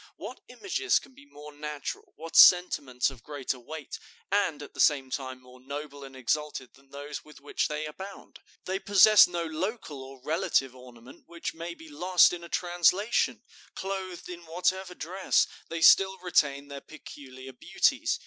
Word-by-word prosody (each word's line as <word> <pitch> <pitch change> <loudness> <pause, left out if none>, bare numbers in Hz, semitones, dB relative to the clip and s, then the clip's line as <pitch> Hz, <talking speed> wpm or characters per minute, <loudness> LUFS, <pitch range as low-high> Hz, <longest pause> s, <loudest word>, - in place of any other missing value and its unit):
What - - -9
images 390 0 0
can 270 - -8
be 285 +2 -18
more 150 - -12
natural, 150 0 -7
what 165 +1 -10
sentiments 140 -8 +5
of 130 -4 -14
greater 135 -1 -4
weight 155 +3 -8 0.3
and 180 -8 0
at - - -12
the - - -14
same 135 -4 +3
time 130 -1 -5
more 125 0 -17
noble 140 +2 -8
and 135 -1 -11
exalted 130 0 -3
than 135 0 -23
those 145 +1 -7
with 150 -2 -16
which 145 - -2
they 150 +1 -4
abound? 190 +6 -10 0.3
They 190 +1 -2
possess 205 +1 +7
no 175 -1 -3
local 160 - -4
or 135 0 -11
relative 135 -4 0
ornament 125 -1 -15
which 170 0 -6
may 170 +1 -7
be 160 - -14
lost 175 +5 +4
in 175 -1 -6
a 170 - -10
translation; 180 +6 +1 0.3
clothed 190 -2 -5
in 175 -2 -9
whatever 180 +2 -1
dress, 185 +4 +1 0.2
they 165 0 -4
still 190 +2 +6
retain 145 -6 0
their 140 -1 -8
peculiar 130 -4 -12
beauties. 125 - 0
155 Hz, 165 wpm, -28 LUFS, 140-180 Hz, 0.3 s, possess